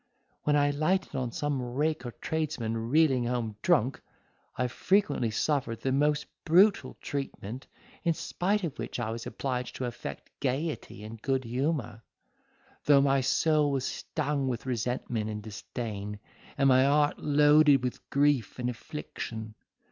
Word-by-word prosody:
When 150 Hz, -, +3 dB
I 145 Hz, 0 st, +3 dB
lighted 155 Hz, +6 st, 0 dB
on 125 Hz, -2 st, -2 dB
some 145 Hz, +1 st, -1 dB
rake 130 Hz, +2 st, -1 dB
or -, -, -5 dB
tradesman 155 Hz, -8 st, -2 dB
reeling 135 Hz, -4 st, +4 dB
home 120 Hz, -3 st, -2 dB
drunk, 135 Hz, -7 st, +2 dB, 0.6 s
I 125 Hz, -, +1 dB
frequently 130 Hz, -, +1 dB
suffered 115 Hz, 0 st, -1 dB
the 135 Hz, -, 0 dB
most 145 Hz, +2 st, +2 dB, 0.2 s
brutal 185 Hz, +5 st, +4 dB
treatment, 135 Hz, -3 st, -5 dB, 0.4 s
in 165 Hz, -1 st, +2 dB
spite 200 Hz, +6 st, -1 dB
of 160 Hz, -6 st, -4 dB
which -, -, -4 dB
I 110 Hz, -2 st, -2 dB
was 115 Hz, 0 st, -5 dB
obliged 125 Hz, -2 st, -3 dB
to 130 Hz, -, -3 dB
affect 115 Hz, -, -7 dB
gaiety 140 Hz, -4 st, -2 dB
and 110 Hz, +1 st, -9 dB
good 135 Hz, 0 st, 0 dB
humour, 125 Hz, -2 st, -2 dB, 0.8 s
though 140 Hz, -2 st, +6 dB
my 135 Hz, -1 st, +3 dB
soul 150 Hz, +3 st, +3 dB
was 135 Hz, -2 st, -1 dB
stung 140 Hz, -2 st, -2 dB
with 120 Hz, -2 st, -3 dB
resentment 120 Hz, -2 st, -2 dB
and 105 Hz, -1 st, -5 dB
disdain, 105 Hz, -1 st, -5 dB, 0.4 s
and 135 Hz, -, +4 dB
my 130 Hz, 0 st, +6 dB
heart 145 Hz, +2 st, +3 dB
loaded 145 Hz, -2 st, +5 dB
with 125 Hz, -, -4 dB
grief 140 Hz, -5 st, +2 dB
and 125 Hz, -1 st, -1 dB
affliction. 115 Hz, -4 st, -7 dB
135 Hz, 145 wpm, -29 LUFS, 120-150 Hz, 0.8 s, though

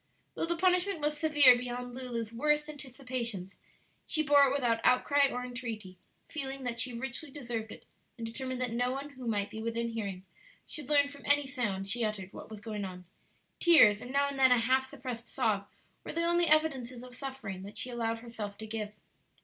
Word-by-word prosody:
Though -, -, -2 dB
the 340 Hz, -, 0 dB
punishment 365 Hz, 0 st, +2 dB
was 295 Hz, 0 st, 0 dB
severe 295 Hz, -4 st, +7 dB
beyond 245 Hz, 0 st, -4 dB
Lulu's 235 Hz, -3 st, -4 dB
worst 300 Hz, +4 st, +1 dB
anticipations, 255 Hz, -9 st, -4 dB, 0.5 s
she 310 Hz, -, +2 dB
bore 285 Hz, -1 st, +6 dB
it -, -, 0 dB
without 245 Hz, -5 st, +1 dB
outcry 280 Hz, +2 st, +4 dB
or 250 Hz, -1 st, -4 dB
entreaty, 225 Hz, -7 st, -6 dB, 0.3 s
feeling 275 Hz, -3 st, -5 dB
that 235 Hz, -2 st, -3 dB
she 250 Hz, +2 st, +2 dB
richly 255 Hz, +5 st, -4 dB
deserved 240 Hz, -6 st, -5 dB
it, -, -, -12 dB, 0.3 s
and 230 Hz, -, -5 dB
determined 255 Hz, +2 st, -4 dB
that 250 Hz, -2 st, 0 dB
no 245 Hz, +2 st, +1 dB
one 275 Hz, +2 st, -4 dB
who 255 Hz, -3 st, -9 dB
might 205 Hz, -3 st, 0 dB
be 220 Hz, -, -6 dB
within 230 Hz, +1 st, -2 dB
hearing 200 Hz, -5 st, -5 dB, 0.4 s
should 295 Hz, -3 st, -4 dB
learn 285 Hz, -1 st, +5 dB
from 285 Hz, 0 st, -11 dB
any 290 Hz, 0 st, +4 dB
sound 220 Hz, -8 st, -2 dB
she 230 Hz, +4 st, 0 dB
uttered 205 Hz, -3 st, -3 dB
what -, -, -10 dB
was 215 Hz, -2 st, -9 dB
going 215 Hz, -2 st, -4 dB
on. 180 Hz, -1 st, -7 dB, 0.5 s
Tears 225 Hz, -12 st, +7 dB
and 250 Hz, -, -7 dB
now 280 Hz, +1 st, +2 dB
and 280 Hz, -1 st, -5 dB
then 260 Hz, -1 st, +6 dB
a 250 Hz, -, +7 dB
half 260 Hz, +3 st, +2 dB
suppressed 255 Hz, -4 st, -7 dB
sob 200 Hz, -2 st, 0 dB, 0.4 s
were -, -, -6 dB
the 335 Hz, -, 0 dB
only 345 Hz, 0 st, +3 dB
evidences 270 Hz, -6 st, +2 dB
of 250 Hz, -1 st, -11 dB
suffering 255 Hz, -8 st, -6 dB
that 200 Hz, +2 st, -9 dB
she 255 Hz, -, -2 dB
allowed 230 Hz, -1 st, -1 dB
herself 220 Hz, -4 st, -6 dB
to 220 Hz, -, -7 dB
give. 215 Hz, -1 st, -4 dB
250 Hz, 200 wpm, -31 LUFS, 225-280 Hz, 0.5 s, severe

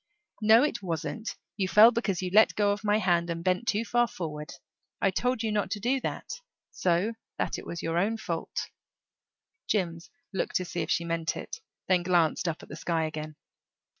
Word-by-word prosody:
"No, 220 Hz, +3 st, +7 dB
it 295 Hz, -7 st, -1 dB
wasn't. 170 Hz, +5 st, -4 dB, 0.2 s
You 190 Hz, -3 st, +1 dB
fell 215 Hz, +5 st, +8 dB
because 205 Hz, -6 st, -1 dB
you 180 Hz, -, -2 dB
let 220 Hz, +1 st, +6 dB
go 205 Hz, -1 st, +3 dB
of 205 Hz, +1 st, -3 dB
my 210 Hz, 0 st, +3 dB
hand 175 Hz, -4 st, +2 dB
and 165 Hz, 0 st, -3 dB
bent 185 Hz, +6 st, 0 dB
too 220 Hz, +2 st, +1 dB
far 240 Hz, +1 st, +2 dB
forward. 150 Hz, -7 st, -6 dB, 0.5 s
I 195 Hz, -, +2 dB
told 250 Hz, +4 st, 0 dB
you 220 Hz, -, 0 dB
not 210 Hz, -1 st, 0 dB
to 210 Hz, -, -3 dB
do 250 Hz, +6 st, +1 dB
that. 460 Hz, -, -5 dB, 0.3 s
So 180 Hz, +5 st, +1 dB, 0.2 s
that -, -, -1 dB
it -, -, -11 dB
was 170 Hz, -, -5 dB
your 165 Hz, +1 st, 0 dB
own 215 Hz, +5 st, +1 dB
fault." -, -, -4 dB, 1.0 s
Jims 170 Hz, -5 st, -1 dB, 0.2 s
looked -, -, -2 dB
to 185 Hz, -, +1 dB
see 175 Hz, -1 st, -3 dB
if -, -, -4 dB
she 170 Hz, -, +1 dB
meant 165 Hz, -1 st, -1 dB
it; 460 Hz, -, -7 dB, 0.3 s
then 185 Hz, -2 st, +3 dB
glanced 175 Hz, -1 st, +2 dB
up 165 Hz, -1 st, -3 dB
at -, -, -13 dB
the 150 Hz, -, -7 dB
sky 165 Hz, 0 st, -1 dB
again. 155 Hz, -1 st, -5 dB
185 Hz, 195 wpm, -28 LUFS, 170-220 Hz, 1.0 s, fell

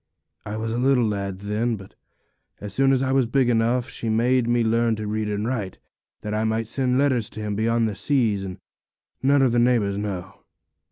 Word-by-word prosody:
I 105 Hz, +1 st, -4 dB
was 110 Hz, 0 st, -3 dB
a 120 Hz, -, -1 dB
little 130 Hz, -2 st, +3 dB
lad 100 Hz, -2 st, -3 dB
then, 110 Hz, +3 st, -1 dB
but 95 Hz, -2 st, -12 dB, 0.7 s
as 100 Hz, -1 st, -7 dB
soon 135 Hz, +2 st, +3 dB
as 135 Hz, 0 st, +2 dB
I 130 Hz, -, 0 dB
was 135 Hz, -3 st, +2 dB
big 130 Hz, +1 st, +2 dB
enough 120 Hz, +2 st, +1 dB
she 115 Hz, -4 st, -5 dB
made 120 Hz, +2 st, +2 dB
me 120 Hz, 0 st, +2 dB
learn 115 Hz, 0 st, +2 dB
to 110 Hz, 0 st, -5 dB
read 105 Hz, 0 st, -2 dB
and 105 Hz, +1 st, -2 dB
write, 105 Hz, -7 st, -3 dB, 0.4 s
that 105 Hz, -, -4 dB
I 110 Hz, +1 st, 0 dB
might 110 Hz, +1 st, 0 dB
send 125 Hz, +2 st, 0 dB
letters 130 Hz, -5 st, +2 dB
to -, -, -9 dB
him 105 Hz, -1 st, -3 dB
beyond 115 Hz, +2 st, +1 dB
the 105 Hz, -, -3 dB
seas 110 Hz, -1 st, +1 dB
and 95 Hz, -2 st, -6 dB, 0.6 s
none 140 Hz, +1 st, +4 dB
of 130 Hz, -, +3 dB
the 120 Hz, -, +2 dB
neighbours 115 Hz, -5 st, +2 dB
know. 95 Hz, -3 st, -5 dB
115 Hz, 210 wpm, -23 LUFS, 105-125 Hz, 0.7 s, none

